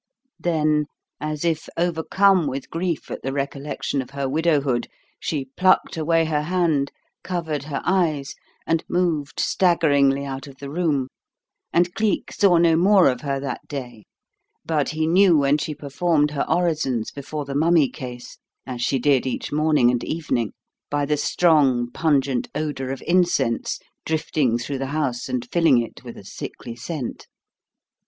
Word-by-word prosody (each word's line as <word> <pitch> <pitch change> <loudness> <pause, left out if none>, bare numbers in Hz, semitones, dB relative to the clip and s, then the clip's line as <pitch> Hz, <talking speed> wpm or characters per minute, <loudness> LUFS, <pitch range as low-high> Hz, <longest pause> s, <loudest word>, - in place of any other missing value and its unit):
Then, 155 -3 +1 0.3
as 150 +1 -3
if 160 -2 -1
overcome 175 +1 +2
with 135 0 -5
grief 170 -1 -2
at - - -5
the 135 - -3
recollection 140 0 -3
of 130 - -9
her 140 0 -3
widowhood, 140 -4 +1 0.3
she 140 -4 -3
plucked 185 0 +3
away 165 +1 +2
her 155 -2 0
hand, 160 -4 +1 0.3
covered 160 -6 -3
her 145 -2 -4
eyes, 160 -7 +1 0.3
and 165 0 +1
moved 165 -5 0
staggeringly 140 -6 +3
out 135 0 -6
of 135 -1 -13
the 140 0 -8
room. 150 -5 0 0.6
And 175 +1 +2
Cleek 215 -3 0
saw 190 -4 +4
no 165 -1 +4
more 190 +1 +5
of 125 - -2
her 140 -2 -2
that 135 -3 -5
day; 120 -7 -7 0.6
but 150 -3 0
he 155 0 -1
knew 175 +1 +5
when 140 +1 +3
she 150 0 -3
performed 150 +1 +1
her 145 - -2
orisons 155 -9 0
before 145 +1 -6
the 140 - -5
mummy 160 0 +4
case 125 -1 -9 0.3
as 125 -2 -5
she 135 +3 +1
did 135 0 +2
each 130 - -3
morning 150 -5 +3
and 125 - -1
evening 125 - -2 0.4
by 145 0 0
the 150 +1 +1
strong, 140 -7 +3
pungent 140 -4 +1
odour 145 -4 -3
of 135 -1 -5
incense 175 -9 +1 0.3
drifting 150 -6 +1
through 130 +3 -4
the 135 - -2
house 130 -5 -2
and 125 -1 -2
filling 165 -7 +4
it 115 - -6
with - - -9
a - - -11
sickly 115 - -8
scent. 135 +1 -6
150 Hz, 155 wpm, -23 LUFS, 135-165 Hz, 0.6 s, more